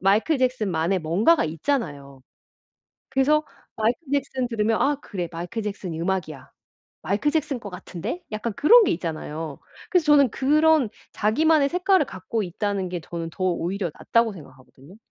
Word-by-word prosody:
마이클 210 - +2
잭슨만의 195 -9 0
뭔가가 195 - +3
있잖아요. 150 - -3 0.9
그래서 300 +3 +2 0.3
마이클 225 +2 +1
잭슨 265 -2 -1
들으면 225 -1 0
'아 290 +1 +2
그래. 180 -9 -5
마이클 180 +7 -5
잭슨이 195 -5 -5
음악이야. 165 -6 -3 0.6
마이클 210 +10 +1
잭슨 300 -4 -1
거 210 - -8
같은데?' 190 - -6
약간 215 +1 -3
그런 420 - +6
게 - - +1
있잖아요. 160 -3 -5 0.3
그래서 360 -6 +2
저는 285 -4 +5
그런 305 -1 +3 0.2
자기만의 290 +7 +3
색깔을 360 -1 +2
갖고 200 +3 -4
있다는 195 +1 -2
게 175 -1 -5
저는 165 0 -6
더 185 - -5
오히려 180 0 -1
낫다고 230 -1 +2
생각하거든요. 135 0 -15
210 Hz, 360 characters per minute, -24 LUFS, 170-280 Hz, 0.9 s, 그런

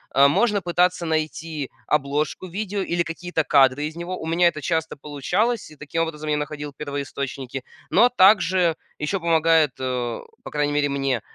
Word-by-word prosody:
э, 140 +1 +7
можно 205 +6 +2
пытаться 180 0 +1
найти 155 -2 -2 0.2
обложку 150 +4 -1
видео 200 +2 -3
или 175 -2 0
какие-то 165 0 -2
кадры 140 0 +4
из 155 +1 -5
него. 175 +2 -5
У - - -6
меня 170 +2 +3
это 155 -3 -1
часто 160 +1 -1
получалось, 180 - -1
и 155 - -14
таким 150 +3 -3
образом 155 -1 -5
я 150 - +2
находил 150 0 -5
первоисточники. 140 -2 -5 0.3
Но 235 +6 +6
также 185 -6 +4 0.2
еще 150 +6 -2
помогает, 165 -3 +3
э, 125 -2 -2 0.2
по - - -7
крайней 145 -1 0
мере, 145 0 +1
мне, 135 -4 0
155 Hz, 165 wpm, -23 LUFS, 145-175 Hz, 0.3 s, э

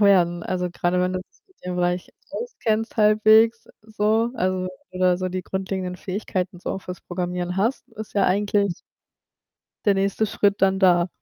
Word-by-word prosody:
werden. 175 -4 +4
Also, 180 0 -2
grade 175 +1 0
wenn 180 0 +1
das 185 - -3 0.2
mit 375 - -30
dem 180 0 -3
Bereich 180 0 0 0.2
auskennst 225 - -2
halbwegs 220 +1 +5
so, 220 +2 +1
also 185 -1 -1 0.2
oder 185 -1 +2
so 185 0 -2
die 185 0 -4
grundlegenden 190 -1 -3
Fähigkeiten 185 -1 -3
so - - -4
auch 195 - -3
fürs 180 0 -7
Programmieren 180 0 -3
hast, 230 +6 0
ist 220 -1 -9
ja 200 -2 +3
eigentlich 200 0 +2 1.1
der 205 - +4
nächste 195 +2 +1
Schritt 200 -1 +1
dann 190 0 +4
da. 175 -2 +4
190 Hz, 160 wpm, -23 LUFS, 180-210 Hz, 1.1 s, halbwegs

